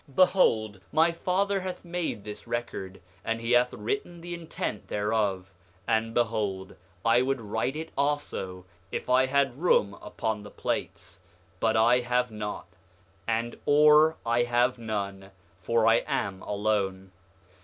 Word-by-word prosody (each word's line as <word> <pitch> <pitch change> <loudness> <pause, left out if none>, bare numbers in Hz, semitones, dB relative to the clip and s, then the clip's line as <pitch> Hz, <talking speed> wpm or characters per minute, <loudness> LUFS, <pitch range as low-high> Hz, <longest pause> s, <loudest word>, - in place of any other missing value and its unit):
8:5 135 - -19
Behold, 110 - +3
my 165 +2 +4
father 195 +4 0
hath 185 -1 -6
made 170 - -3
this 105 0 -8
record, 95 -5 -4 0.2
and 115 0 -1
he 115 +1 -3
hath 125 0 +4
written 410 - -4
the 175 +1 -6
intent 165 - -5
thereof. 105 -3 -1 0.3
And 115 0 0
behold, 105 -5 -1 0.3
I 115 +1 +5
would 135 +1 0
write 110 +5 -2
it 160 +1 -6
also 140 -11 -2 0.3
if - - -3
I 130 +1 +5
had 140 -2 +2
room 105 - +2
upon 110 -2 -3
the 105 - -10
plates, - - -4 0.4
but 110 -1 +2
I 120 +3 +5
have 125 0 0
not; 105 -1 -5 0.6
and 115 +1 -1
ore 150 +2 +6
I 120 +1 +2
have 120 +1 +2
none, 100 -3 -4 0.3
for 115 +4 +2
I 115 0 +6
am 95 -1 -2
alone. 100 -2 -1
115 Hz, 145 wpm, -28 LUFS, 105-140 Hz, 0.6 s, ore